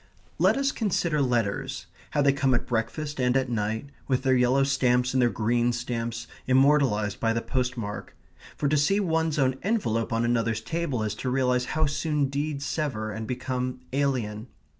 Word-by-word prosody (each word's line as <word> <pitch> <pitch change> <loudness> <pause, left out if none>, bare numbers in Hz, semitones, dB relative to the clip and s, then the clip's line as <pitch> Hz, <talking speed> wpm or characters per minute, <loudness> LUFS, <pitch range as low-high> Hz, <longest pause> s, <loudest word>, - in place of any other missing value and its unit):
Let 190 +8 +4
us 275 0 +1
consider 170 - 0
letters 120 -6 -1 0.2
how 145 - +1
they 140 -1 +4
come 135 -2 +2
at - - -1
breakfast, 135 +6 -2
and 125 +1 +3
at 130 -2 -1
night, 110 +5 -2 0.2
with 130 -1 +1
their 130 -1 +3
yellow 125 +2 +3
stamps 125 -2 +2
and 130 - +3
their 120 - +4
green 120 +2 +1
stamps, 120 -1 -3 0.2
immortalized 130 -6 +3
by 115 -1 +1
the 115 - 0
postmark 125 -5 -3 0.4
for 145 - 0
to 150 +2 +2
see 165 +8 +3
one's 160 -5 0
own 130 -2 +1
envelope 120 - 0
on 115 +1 +1
another's 115 -2 0
table 140 -2 -2
is 105 -2 -1
to 130 - -1
realize 125 -1 +1
how 155 - +3
soon 150 -1 0
deeds 140 0 -2
sever 120 -9 -2
and 110 +1 -5
become 125 0 -3
alien. 125 -6 -1
130 Hz, 175 wpm, -26 LUFS, 115-145 Hz, 0.4 s, Let